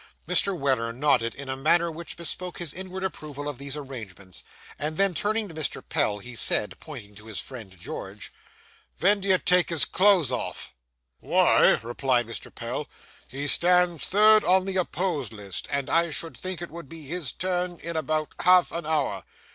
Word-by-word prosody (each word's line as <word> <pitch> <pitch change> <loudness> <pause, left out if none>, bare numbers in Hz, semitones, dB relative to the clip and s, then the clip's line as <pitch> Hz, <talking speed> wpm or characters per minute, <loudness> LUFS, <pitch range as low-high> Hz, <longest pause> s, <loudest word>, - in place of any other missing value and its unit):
Mr. 180 +2 +3
Weller 130 -6 +1
nodded 115 -3 +1
in 140 -1 -8
a 130 - -2
manner 165 +5 +2
which 165 +1 -7
bespoke 175 +1 -5
his 170 -4 -3
inward 190 +1 -6
approval 150 -6 -5
of 145 -4 -5
these 140 +1 -3
arrangements; 110 -10 -7 0.4
and 155 +2 -3
then, 195 -1 +3
turning 215 +6 0
to 170 - -10
Mr. 155 -2 -3
Pell, 105 -1 +1 0.2
said, 105 - +2
pointing 115 -10 -10
to 105 +2 -13
his 110 -3 -4
friend 110 -8 -8
George 95 +3 -7 0.6
'Ven 200 +3 +4
do 195 - -5
you 190 -1 +6
take 180 -1 +3
his 165 -4 +5
cloths 185 - +4
off?' 125 - -4 0.5
'Why,' - - +4
replied 120 +1 +1
Mr. 115 - -7
Pell, 125 +5 -4 0.4
'he 140 +2 -5
stands 175 +1 +3
third 215 +2 +6
on 185 +1 +4
the 190 -1 -2
opposed 175 - -1
list, 100 -3 -6
and 140 -1 -1
I 170 0 +2
should 160 -2 -4
think 185 +6 -5
it 175 - -7
would 170 -4 -9
be 165 -2 -10
his 160 -2 -3
turn 180 -1 -1
in 170 +1 -6
about 155 -1 -1
half 180 0 +5
an 170 -2 -4
hour. 140 -11 0
155 Hz, 180 wpm, -26 LUFS, 130-180 Hz, 0.6 s, you